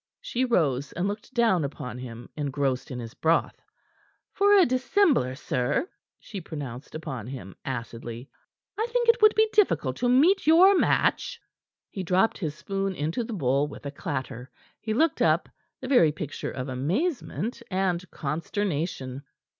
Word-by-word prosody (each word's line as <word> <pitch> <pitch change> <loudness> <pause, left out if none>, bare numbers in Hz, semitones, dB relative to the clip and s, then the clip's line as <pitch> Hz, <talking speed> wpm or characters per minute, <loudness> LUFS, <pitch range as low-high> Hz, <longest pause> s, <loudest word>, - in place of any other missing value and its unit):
She 260 - -1
rose, 145 - +1
and 175 +3 -1
looked 205 +4 -5
down 230 -9 +3
upon 135 -3 -5
him 120 -2 -8
engrossed 140 -3 -1
in 125 - -5
his 115 -2 -7
broth. 165 +1 +1 0.7
"For 405 +1 +3
a 375 - +7
dissembler, 255 - +2
sir," 130 - -1 0.3
she 200 -3 -8
pronounced 145 -5 -7
upon 135 -8 -5
him 110 -8 -8
acidly, 120 0 -6 0.5
"I 445 - +1
think 475 0 +1
it 465 0 +5
would 430 0 +7
be 440 0 +5
difficult 145 - +2
to 245 - +1
meet 310 +9 +4
your 365 +5 +7
match." 480 +5 +1 0.5
He 195 - -4
dropped 185 +4 +2
his 155 -6 -3
spoon 195 +2 -3
into 160 - -2
the 230 - -6
bowl 140 -4 +1
with 145 - -11
a 140 - -3
clatter. 130 -3 -5 0.3
He 220 - -4
looked 320 +4 +2
up, - - +3 0.3
the - - -5
very 245 - +5
picture 150 -1 -5
of 130 0 -5
amazement 220 - -2
and 185 -2 0
consternation. 150 -4 -3
165 Hz, 155 wpm, -26 LUFS, -, 0.7 s, a